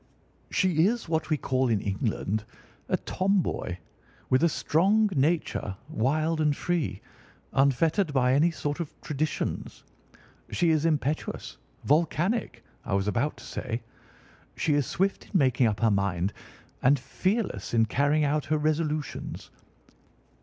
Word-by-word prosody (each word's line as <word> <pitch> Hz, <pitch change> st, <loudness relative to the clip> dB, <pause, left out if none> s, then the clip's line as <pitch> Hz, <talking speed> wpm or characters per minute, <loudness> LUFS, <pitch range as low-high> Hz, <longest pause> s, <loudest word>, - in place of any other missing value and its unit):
She 180 Hz, -2 st, +3 dB
is 235 Hz, -1 st, -1 dB
what 160 Hz, 0 st, -1 dB
we 155 Hz, -, +2 dB
call 130 Hz, -1 st, 0 dB
in 110 Hz, -3 st, +2 dB
England 105 Hz, +1 st, -2 dB, 0.5 s
a 185 Hz, -, +2 dB
tomboy, 185 Hz, -, -1 dB, 0.5 s
with 130 Hz, +4 st, +4 dB
a 170 Hz, -, +5 dB
strong 200 Hz, +8 st, +2 dB
nature, 140 Hz, -, 0 dB
wild 155 Hz, +7 st, +1 dB
and 150 Hz, -2 st, +2 dB
free, 165 Hz, -, -1 dB, 0.5 s
unfettered 150 Hz, +6 st, +2 dB
by 130 Hz, -2 st, +3 dB
any 150 Hz, +5 st, +4 dB
sort 145 Hz, -2 st, -3 dB
of 165 Hz, -4 st, -6 dB
traditions. 150 Hz, +1 st, -3 dB, 0.7 s
She 170 Hz, -2 st, +2 dB
is 155 Hz, 0 st, +2 dB
impetuous—volcanic, 155 Hz, -, -1 dB, 0.2 s
I 95 Hz, -, -1 dB
was 100 Hz, +1 st, 0 dB
about 120 Hz, +8 st, 0 dB
to -, -, -12 dB
say. 120 Hz, -2 st, -4 dB, 0.7 s
She 155 Hz, -, +1 dB
is 145 Hz, -3 st, +1 dB
swift 195 Hz, +2 st, -1 dB
in -, -, -20 dB
making 130 Hz, -5 st, +3 dB
up 105 Hz, 0 st, -2 dB
her 115 Hz, -1 st, +4 dB
mind 100 Hz, -1 st, 0 dB, 0.5 s
and 140 Hz, +3 st, +5 dB
fearless 195 Hz, -, -2 dB
in 115 Hz, -1 st, +5 dB
carrying 145 Hz, +6 st, +2 dB
out 150 Hz, 0 st, +1 dB
her 155 Hz, -, +1 dB
resolutions. 155 Hz, 0 st, -2 dB
150 Hz, 130 wpm, -27 LUFS, 125-165 Hz, 0.7 s, a